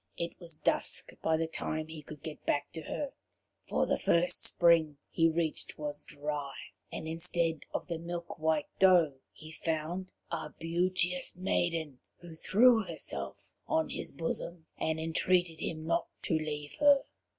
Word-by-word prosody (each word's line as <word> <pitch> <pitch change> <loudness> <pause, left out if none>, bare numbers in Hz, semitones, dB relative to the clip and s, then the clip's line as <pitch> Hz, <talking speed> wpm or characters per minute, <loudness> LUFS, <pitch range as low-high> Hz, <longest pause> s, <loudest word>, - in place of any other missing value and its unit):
It 170 0 -2
was 170 -3 -5
dusk - - 0
by 160 0 +3
the 165 - +1
time 155 -1 -2
he 160 -1 -8
could 150 0 -11
get 155 -2 -7
back 145 0 0
to 160 - -5
her, 275 - -3 0.6
for - - +2
the - - +1
first 170 +1 +2
spring 165 -4 +4
he 165 0 +4
reached 160 -1 -1
was 145 -1 -1
dry, 145 -1 -4 0.4
and 160 - -5
instead 165 -1 0
of - - -2
the 170 -2 -3
milk 170 0 -5
white 155 -1 +2
doe, 175 -8 +6
he 155 0 -11
found 165 +3 -2 0.2
a - - -4
beauteous 180 +2 +1
maiden, 165 -6 0 0.2
who 175 -2 -11
threw 220 +7 +5
herself - - -5 0.2
on 320 0 +2
his - - -3
bosom 165 0 -3
and 160 0 -1
entreated 165 +1 +2
him 155 -1 -3
not 170 +1 +1 0.2
to - - 0
leave 150 -2 -2
her. 285 -2 +7
165 Hz, 155 wpm, -32 LUFS, 155-175 Hz, 0.6 s, her